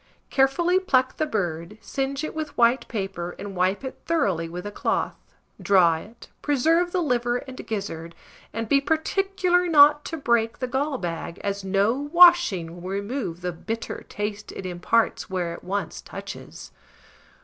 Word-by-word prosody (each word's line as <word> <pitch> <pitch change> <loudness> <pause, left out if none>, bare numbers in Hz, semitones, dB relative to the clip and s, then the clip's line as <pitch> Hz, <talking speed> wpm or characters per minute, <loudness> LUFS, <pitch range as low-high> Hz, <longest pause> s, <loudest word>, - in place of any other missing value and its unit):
Carefully 340 +7 +3
pluck 260 -8 +1
the 310 - 0
bird, 175 - -3
singe 275 +3 -3
it 310 - -4
with 310 -1 -5
white 240 +2 +3
paper, 190 -5 -4
and 200 -1 -7
wipe 185 +6 +1
it 265 - -6
thoroughly 195 - +1
with 180 +2 -7
a 205 - -4
cloth; - - -1 0.5
draw 175 -5 +4
it, 220 +8 -12
preserve 325 +5 +2
the 360 -1 0
liver 240 -4 +1
and 255 0 -9
gizzard, 170 -6 -5 0.4
and 225 0 -4
be 275 +4 +4
particular 360 +3 +1
not 295 -2 +6
to 325 - -4
break 235 -5 +1
the 255 - -2
gall 270 +3 -1
bag, 170 -2 -5
as 200 -1 -2
no 195 +3 +2
washing 290 - +4
will 180 - -6
remove 200 -3 -3
the 180 0 -2
bitter 225 +7 -5
taste 205 0 -4
it 190 - -7
imparts 185 +6 0
where 180 -3 -2
it - - -10
once 200 +2 -3
touches. - - -9
230 Hz, 160 wpm, -25 LUFS, 190-290 Hz, 0.5 s, not